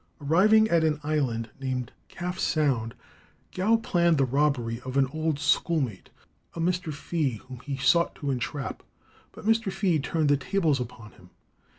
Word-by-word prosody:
Arriving 205 +9 +4
at 165 -1 +3
an 155 -2 +1
island 130 -7 -1
named 130 -3 -3 0.2
Calf 180 +1 -5
Sound, 130 -8 0 0.6
Gow 205 +5 +2
planned 170 -7 +2
the 135 - +3
robbery 125 -4 0
of 130 +1 -4
an 135 - +5
old 155 -1 -1
schoolmate, 140 - 0 0.5
a - - -6
Mr. 175 -1 0
Fea, 150 -2 -2
whom 130 -2 -9
he 135 +2 -5
sought 170 +6 +3
to 145 -3 -3
entrap. 135 +2 -4 0.5
But - - -12
Mr. 225 -2 +2
Fea 180 -5 +1
turned 155 +1 0
the 145 - +4
tables 155 -1 +1
upon 120 -3 -7
him. 90 - -19
150 Hz, 160 wpm, -27 LUFS, 130-170 Hz, 0.6 s, an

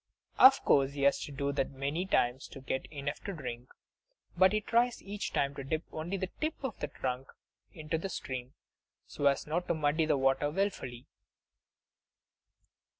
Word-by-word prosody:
Of 265 +1 +8
course 140 -1 +4
he 140 -1 -3
has 140 - +4
to - - -9
do 140 0 -1
that 140 -1 0
many 140 +7 -2
times, 125 -7 +1
to - - -10
get 130 0 -3
enough 145 -1 -4
to 200 - -3
drink. 125 -6 -6 0.7
But 185 +1 +6
he 215 - +2
tries 235 +3 +1
each 205 +1 -4
time 140 0 +1
to 140 - -6
dip 155 +4 -2
only 170 +5 -3
the 190 -1 -3
tip 310 +1 0
of 260 -6 -4
the - - -2
trunk 130 0 -4 0.4
into 155 0 -3
the 195 - -4
stream, 130 -6 -5 0.5
so 145 - 0
as 140 - +2
not 170 +4 -2
to - - +1
muddy 155 +1 +1
the 150 -2 +3
water 135 +2 +2
willfully! 150 -9 -2
145 Hz, 175 wpm, -31 LUFS, 135-185 Hz, 0.7 s, Of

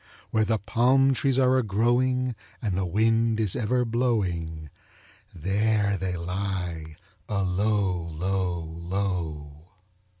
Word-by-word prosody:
Where 110 -1 +2
the 110 +1 +1
palm 130 +6 +3
trees 135 0 +1
are 130 0 +4
a - - +3
growing, 125 +4 +1 0.3
and 105 -5 -2
the 95 0 0
wind 115 +4 +2
is 105 -5 0
ever 125 +2 +1
blowing, 90 - -1 0.6
There 100 +4 +1
they 90 -1 -2
lie 90 -3 -4 0.3
alow, 100 -2 0
low, 90 +1 -1
low. 80 -3 -4
100 Hz, 110 wpm, -26 LUFS, 90-115 Hz, 0.6 s, are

